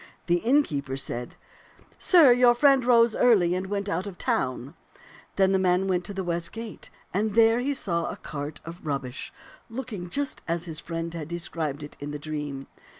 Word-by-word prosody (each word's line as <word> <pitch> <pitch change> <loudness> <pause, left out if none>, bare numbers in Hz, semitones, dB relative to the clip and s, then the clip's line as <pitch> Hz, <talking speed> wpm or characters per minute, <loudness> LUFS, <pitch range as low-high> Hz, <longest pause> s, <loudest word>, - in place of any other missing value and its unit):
The 175 -1 +3
innkeeper 165 - +1
said, 120 -2 -4 0.6
*Sir, 320 -9 +7
your 245 -1 +5
friend 275 0 +5
rose 235 -2 +4
early 195 -8 +4
and 185 +1 -2
went 200 0 -2
out 200 -1 -2
of 190 -3 -8
town.' 130 +3 -1 0.6
Then 190 -1 +3
the 190 - +3
man 185 0 +2
went 180 -2 0
to 200 - -4
the 190 - -2
west 170 -1 -2
gate, 225 -1 -7 0.2
and 210 +2 0
there 230 +1 +5
he 280 +3 -1
saw 170 -9 -1
a - - -6
cart 145 +1 -6
of 170 +2 -9
rubbish 135 -4 -4 0.4
looking 225 -7 -6
just 285 +7 -2
as 170 +1 -1
his 160 -3 -4
friend 165 0 -5
had 160 -3 -5
described 160 -3 -4
it 145 - -10
in 145 - -6
the 150 - -4
dream. 145 -2 -5
180 Hz, 185 wpm, -26 LUFS, 155-225 Hz, 0.6 s, Sir